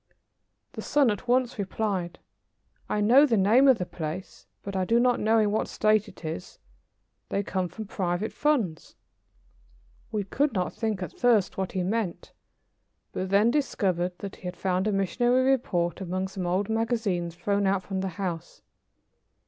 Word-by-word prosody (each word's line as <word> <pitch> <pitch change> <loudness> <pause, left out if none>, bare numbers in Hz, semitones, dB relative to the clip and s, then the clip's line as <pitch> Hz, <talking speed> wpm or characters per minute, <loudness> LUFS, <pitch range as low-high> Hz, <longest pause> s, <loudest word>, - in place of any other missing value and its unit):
The - - -7
son 285 -5 +3
at 205 +4 -5
once 245 -2 +1
replied: 195 -3 -2 0.7
"I 210 - 0
know 255 +8 +6
the 230 -4 +2
name 225 +8 +5
of 260 -3 +6
the 180 - -3
place, 170 +2 -7 0.2
but 200 -1 -6
I 190 - +1
do 230 +5 +3
not 245 0 +3
know 220 +2 +3
in 210 -2 +3
what 215 - 0
state 215 0 +2
it 185 -4 -12
is. 160 +3 -6 0.7
They 200 - -1
come 185 -2 -2
from 220 +4 -7
Private 185 +1 -2
Funds." 235 - -1 1.2
We 210 -2 -1
could 275 +8 0
not 185 -3 -1
think 215 -5 -2
at 175 - -7
first 225 -6 +2
what 190 -1 -3
he 185 -2 -1
meant, 200 -1 -3 0.8
but 185 0 -3
then 205 +4 +4
discovered 185 - 0
that 200 -1 -7
he - - -21
had 180 -1 -6
found 185 +1 0
a - - +2
missionary 240 +6 +2
report 175 -10 0
among 185 +1 -2
some 190 -2 -4
old 185 +3 0
magazines 220 -7 -1
thrown 200 +2 0
out 190 -1 +1
from 190 0 -4
the 190 - -2
house. 175 -4 -5
200 Hz, 170 wpm, -27 LUFS, 185-225 Hz, 1.2 s, know